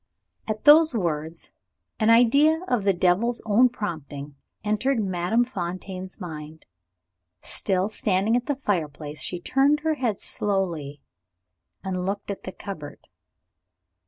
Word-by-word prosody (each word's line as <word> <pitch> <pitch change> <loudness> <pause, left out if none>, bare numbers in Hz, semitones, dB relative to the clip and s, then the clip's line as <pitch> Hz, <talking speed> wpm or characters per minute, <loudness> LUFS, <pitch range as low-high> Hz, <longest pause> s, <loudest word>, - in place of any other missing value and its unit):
At 215 -1 -3
those 310 -1 +7
words, 165 -4 -3 0.5
an 215 0 +3
idea 280 +8 +5
of 235 -6 0
the 200 - +5
devil's 190 +7 +2
own 230 +4 +5
prompting 150 - -6 0.3
entered 220 +5 +1
Madame 190 +3 +1
Fontaine's 185 -2 -6
mind. 155 -3 -8 0.8
Still 190 -1 0
standing 210 +1 +1
at 245 0 -1
the 290 - 0
fireplace, 155 - -3
she 180 - -3
turned 275 +9 +2
her 320 0 +1
head 245 -9 -1
slowly, 170 -9 -2 0.8
and 185 -1 -3
looked 200 +2 -3
at 200 - -8
the 185 - -5
cupboard. 160 -7 -9
195 Hz, 125 wpm, -25 LUFS, 175-235 Hz, 0.8 s, those